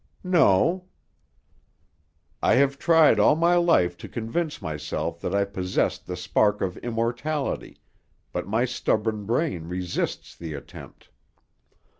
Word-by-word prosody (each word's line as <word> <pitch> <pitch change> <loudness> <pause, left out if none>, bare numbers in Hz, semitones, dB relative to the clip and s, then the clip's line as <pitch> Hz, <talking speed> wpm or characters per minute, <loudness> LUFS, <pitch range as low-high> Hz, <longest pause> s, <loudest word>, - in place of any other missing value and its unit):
"No." 175 - +3 1.6
"I - - +4
have 140 +1 +2
tried 160 -9 +5
all 105 - +5
my 170 +2 +3
life 165 - +3
to - - -9
convince 145 +8 -3
myself 80 -7 -4
that 95 - -2
I 100 0 +2
possessed 95 -2 -2
the 90 - -4
spark 105 +4 +1
of 90 -2 -1
immortality, 120 +5 -3 0.5
but - - -4
my 110 +5 +1
stubborn 110 -4 -1
brain 115 - -1
resists 90 0 -3
the 80 -3 -7
attempt. 70 - -12
115 Hz, 120 wpm, -25 LUFS, 95-150 Hz, 1.6 s, tried